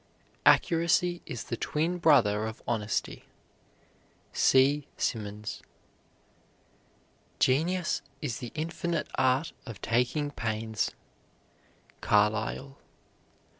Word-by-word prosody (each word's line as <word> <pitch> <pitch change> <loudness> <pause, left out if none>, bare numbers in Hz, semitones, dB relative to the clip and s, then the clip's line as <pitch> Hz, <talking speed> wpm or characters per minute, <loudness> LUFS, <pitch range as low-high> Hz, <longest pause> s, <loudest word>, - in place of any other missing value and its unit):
Accuracy 170 +1 +3
is 120 - -5
the - - -4
twin 165 +8 -1
brother 110 -10 +4
of 110 - -8
honesty. 105 -3 -2 1.1
C. 135 +2 +4
SIMMONS. 105 -1 -3 1.8
Genius 170 +7 +1 0.2
is 115 - -3
the 120 - -7
infinite 165 +1 -2
art 130 +4 +2 0.2
of 115 -4 -8
taking 125 +5 0
pains. 110 -2 -2 1.1
CARLYLE. 110 +6 +1
130 Hz, 80 wpm, -29 LUFS, 110-160 Hz, 1.8 s, brother